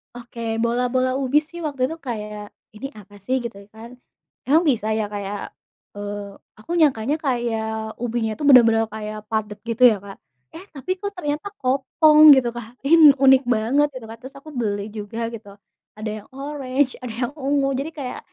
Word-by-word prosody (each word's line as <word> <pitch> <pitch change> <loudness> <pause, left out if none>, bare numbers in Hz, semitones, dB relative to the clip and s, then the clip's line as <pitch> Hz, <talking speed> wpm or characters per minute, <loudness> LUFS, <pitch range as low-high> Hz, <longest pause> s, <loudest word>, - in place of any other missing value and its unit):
Oke, 240 -1 -11 0.2
bola-bola 250 +2 +1
ubi 275 +2 +2
sih 345 +3 -11
waktu 280 -4 -4
itu 325 - -6
kayak, 210 -2 -5 0.3
"Ini 250 +6 -6
apa 205 0 -16
sih?", 260 - 0
gitu 230 -4 -6 0.2
kan. 225 +2 -10 0.6
Emang 310 +5 +4
bisa 220 -5 0
ya 220 - 0
kayak, 205 0 -5 0.4
eee, 205 -1 -7 0.2
aku 215 - -10
nyangkanya 275 -2 +2
kayak 220 -3 -2
ubinya 230 -2 -1
itu 295 - -7
bener-bener 230 -4 +6
kayak 215 0 -7
padat, 210 -1 -3
gitu 230 +2 0
ya, 215 - -1
Kak. 200 0 -11 0.4
Eh, 335 - -9
tapi 295 +4 -6
kok 405 +1 -4
ternyata 295 +3 -3
kopong, 300 +4 +6
gitu, 260 -2 +2
Kak. 240 +1 -9
Ini 320 -2 +8
unik 265 -1 +7
banget, 265 +7 +2
gitu 250 - -8
kan. 225 - -9
Terus 270 +1 -10
aku 310 - -13
beli 205 -4 -2
juga 210 +2 -6
gitu, 215 -3 -9 0.5
ada 215 0 -4
yang - - -23
oranye, 275 -1 -2
ada 250 - -5
yang 245 +2 -1
ungu, 280 -1 0
jadi 305 +4 -4
kayak 260 -3 -5
245 Hz, 175 wpm, -22 LUFS, 220-275 Hz, 0.6 s, Ini